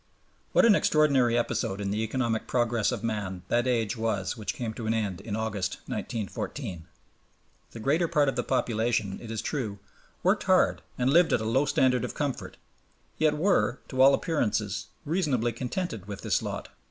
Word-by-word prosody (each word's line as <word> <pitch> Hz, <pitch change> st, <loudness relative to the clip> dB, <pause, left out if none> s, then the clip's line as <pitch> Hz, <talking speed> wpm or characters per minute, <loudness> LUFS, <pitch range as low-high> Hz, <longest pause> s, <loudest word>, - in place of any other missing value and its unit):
What -, -, +6 dB
an 230 Hz, -, +7 dB
extraordinary 140 Hz, -10 st, +3 dB
episode 100 Hz, -4 st, -1 dB
in 100 Hz, -1 st, -2 dB
the 105 Hz, +2 st, -1 dB
economic 115 Hz, 0 st, -1 dB
progress 120 Hz, -3 st, +1 dB
of -, -, -4 dB
man 100 Hz, -5 st, -3 dB
that 120 Hz, +1 st, +2 dB
age 115 Hz, -4 st, +1 dB
was 110 Hz, -4 st, -1 dB
which 110 Hz, -2 st, -4 dB
came 115 Hz, -3 st, -3 dB
to 110 Hz, 0 st, -5 dB
an 110 Hz, -, +1 dB
end 100 Hz, -5 st, -2 dB
in 105 Hz, -, -4 dB
August, 105 Hz, -4 st, -2 dB
1914! 100 Hz, -, -5 dB, 0.8 s
The 115 Hz, -, -10 dB
greater 155 Hz, +9 st, +2 dB
part 150 Hz, -3 st, +2 dB
of 135 Hz, -, 0 dB
the -, -, +1 dB
population, 115 Hz, -5 st, 0 dB
it 115 Hz, -, -9 dB
is 110 Hz, -1 st, -3 dB
true, 115 Hz, -9 st, -3 dB, 0.5 s
worked -, -, +2 dB
hard -, -, +3 dB, 0.2 s
and 130 Hz, +2 st, +2 dB
lived 175 Hz, +1 st, +5 dB
at -, -, +3 dB
a -, -, -3 dB
low 130 Hz, +6 st, +2 dB
standard 125 Hz, -4 st, +2 dB
of -, -, -4 dB
comfort, 145 Hz, -3 st, -3 dB, 0.6 s
yet 155 Hz, -1 st, +3 dB
were, 170 Hz, -6 st, +2 dB
to 130 Hz, -1 st, 0 dB
all 135 Hz, +1 st, +8 dB
appearances, 105 Hz, -, -1 dB, 0.2 s
reasonably 145 Hz, -8 st, 0 dB
contented 120 Hz, -, -4 dB
with 100 Hz, -1 st, -6 dB
this -, -, +1 dB
lot. -, -, -5 dB
115 Hz, 175 wpm, -28 LUFS, 110-135 Hz, 0.8 s, all